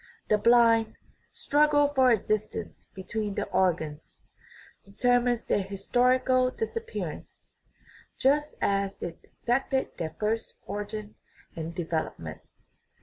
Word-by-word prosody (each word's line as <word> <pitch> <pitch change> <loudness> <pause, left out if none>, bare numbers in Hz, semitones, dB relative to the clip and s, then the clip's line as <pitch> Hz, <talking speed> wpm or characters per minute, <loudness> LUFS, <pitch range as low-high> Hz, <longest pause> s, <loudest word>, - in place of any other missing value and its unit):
The 215 - +4
blind 230 -1 +4 0.2
" - - -40
struggle 290 0 +4
for 260 -2 +5
existence 215 0 -2
between 205 +1 -4
the - - -1
organs" 165 -5 -1 0.6
determines 245 +3 +1
their - - +1
historical 255 +6 +2
dis 450 - -4
appearance, 460 0 -6 0.7
just 295 +3 +2
as 195 0 0
it 165 -1 -5 0.2
effected 265 +2 0
their 160 -2 -4
first 220 +1 -1
origin 205 +1 -5 0.4
and 165 0 -5
de 175 -2 -3
velopment. 155 - -4
220 Hz, 110 wpm, -28 LUFS, 195-255 Hz, 0.7 s, for